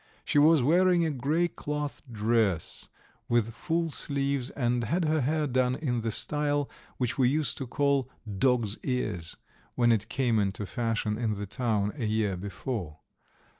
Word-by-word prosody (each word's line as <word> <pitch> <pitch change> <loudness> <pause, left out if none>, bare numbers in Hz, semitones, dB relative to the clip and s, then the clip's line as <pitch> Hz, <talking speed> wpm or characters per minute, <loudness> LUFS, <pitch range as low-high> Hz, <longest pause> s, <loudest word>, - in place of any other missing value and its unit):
She 145 - +3
was 155 -2 +6
wearing 175 +3 +4
a 160 - 0
grey 150 +6 +1
cloth 150 -3 -4
dress 110 -5 0 0.4
with 115 -1 +2
full 165 +5 -1
sleeves, 140 -3 -1
and 120 -3 0
had 165 - 0
her 155 0 +2
hair 150 +3 +1
done 130 -2 +1
in 125 -6 -1
the 115 - -1
style 145 +3 0 0.3
which 125 +1 -1
we 125 -2 +5
used 150 +2 +1
to 135 - -4
call 140 0 +1 0.3
"dogs' 120 -4 +2
ears," 90 - -2 0.4
when 120 -1 +4
it 110 -1 +1
came 120 -5 +1
into 100 0 -1
fashion 115 0 -1
in 115 -3 0
the 100 0 -4
town 105 -2 0
a 130 -6 -3
year 105 -2 +1
before. 100 - -5
125 Hz, 160 wpm, -28 LUFS, 110-145 Hz, 0.4 s, was